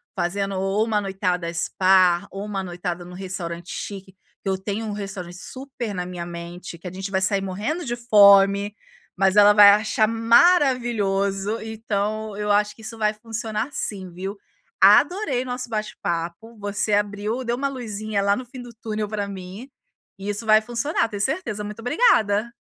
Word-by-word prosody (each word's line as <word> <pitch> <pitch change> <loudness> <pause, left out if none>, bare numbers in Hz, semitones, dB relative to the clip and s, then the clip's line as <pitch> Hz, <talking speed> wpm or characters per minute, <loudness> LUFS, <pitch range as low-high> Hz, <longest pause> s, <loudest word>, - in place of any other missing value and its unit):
fazendo 195 +2 -1
ou 195 +3 +1
uma 215 -2 0
noitada 185 -3 -2
spa, 185 +1 +3
ou 195 +1 -6
uma 200 -2 -3
noitada 175 -1 -5
em - - -12
um 180 - -11
restaurante 180 -2 -6
chique. 195 -1 -7 0.3
Eu 190 -1 +1
tenho 210 +3 -3
um 215 - -4
restaurante 195 -4 -6
super 255 -1 -6
na 180 -1 -3
minha 180 -1 -6
mente, 170 0 -8
que 175 - -10
a - - -6
gente 190 +2 -5
vai 190 -1 0
sair 195 +1 +2
morrendo 210 - -3
de 240 -2 -2
fome, 200 -3 +5 0.4
mas 190 0 +3
ela 205 0 +7
vai 205 -1 +9
achar 215 +1 +2
maravilhoso. 230 - +2
Então, 215 -1 -3
eu 210 0 -1
acho 210 +1 +2
que 225 - -16
isso 225 +1 -6
vai 215 -1 +1
funcionar, 225 +1 -4
sim, 190 -8 -4
viu. 190 +4 -6 0.4
Adorei 325 -10 +4
nosso 250 -1 -4
bate-papo, 215 -1 -4
você 205 0 -2
abriu 205 +4 -1
deu 235 0 -1
uma 275 +2 0
luzinha 215 -5 -3
lá 200 0 +3
no 255 - -6
fim 250 +1 -10
do 245 -1 -11
túnel 215 -2 -4
pra 205 -2 -3
mim, 195 +6 -8 0.5
e 195 +1 -6
isso 205 +3 -3
vai 215 0 +6
funcionar, 240 +2 -1
tenho 205 -2 -4
certeza. 265 - -2
Muito 210 +1 -8
obrigada. 230 - +2
205 Hz, 170 wpm, -23 LUFS, 195-225 Hz, 0.5 s, vai